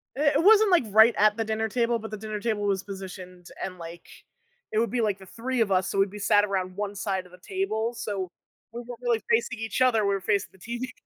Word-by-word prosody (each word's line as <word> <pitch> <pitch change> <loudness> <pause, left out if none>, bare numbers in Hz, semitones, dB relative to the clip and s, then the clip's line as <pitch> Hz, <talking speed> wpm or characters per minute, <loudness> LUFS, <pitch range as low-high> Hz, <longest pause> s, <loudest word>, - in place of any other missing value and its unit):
It 285 +1 +2
it 305 - +3
wasn't, 425 0 +6
like, 350 - +5
right 220 +3 +6
at 210 +1 +4
the 225 - 0
dinner 220 0 -1
table, 235 +1 0
but 220 0 -8
the 215 - -4
dinner 215 0 -5
table 215 -2 -1
was 195 -2 0
positioned 185 -2 -9 0.2
and, 185 -1 -5
like, 170 0 -10 0.6
it 215 - +1
would 230 -1 +1
be, 245 -2 0
like, 205 -3 0
the 190 - -12
3 240 +5 -3
of 200 -3 +1
us, 185 0 +2
so 195 - -1
we'd 195 0 +3
be 210 - -9
sat 205 0 +4
around 185 -2 -3
1 205 0 -4
side 195 -2 -2
of 180 - -17
the 180 - -15
table, 240 - -2
so 195 -5 -4 0.4
we 240 +1 -6
weren't 240 -1 -9
really 235 -2 +1
facing 230 0 +1
each 225 +3 -3
other, 225 -5 +4
we 200 - +2
were 195 - -4
facing 200 +2 0
the 190 - -22
TV. 240 +5 -5
215 Hz, 255 wpm, -26 LUFS, 195-235 Hz, 0.6 s, wasn't